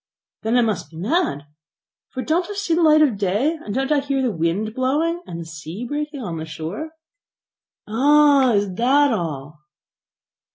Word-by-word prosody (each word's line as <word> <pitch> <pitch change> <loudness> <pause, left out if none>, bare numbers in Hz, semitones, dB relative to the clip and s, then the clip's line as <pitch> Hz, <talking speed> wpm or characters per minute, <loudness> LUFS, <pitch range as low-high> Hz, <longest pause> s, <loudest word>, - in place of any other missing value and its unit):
"Then 225 +2 +1
I - - +5
must 220 -4 -1
be 160 - -13
mad; 205 - -1 0.6
for 255 - -5
don't 340 +4 0
I 410 - -5
see 400 -4 -1
the 340 - +2
light 310 -1 +6
of 240 -9 +1
day, 215 - 0
and 210 - -6
don't 270 +6 -1
I 295 - +4
hear 275 -1 -1
the 250 - +1
wind 170 +7 -1
blowing, 300 +7 0
and 170 - -6
the 165 - -6
sea 160 +7 -7
breaking 290 0 -4
on 170 -5 -4
the 160 - -5
shore?" 160 - -6 1.0
"Ah! 280 +2 +4
is 200 -2 0
that 265 +6 +3
all?" 150 -6 -4
245 Hz, 175 wpm, -21 LUFS, 180-295 Hz, 1.0 s, light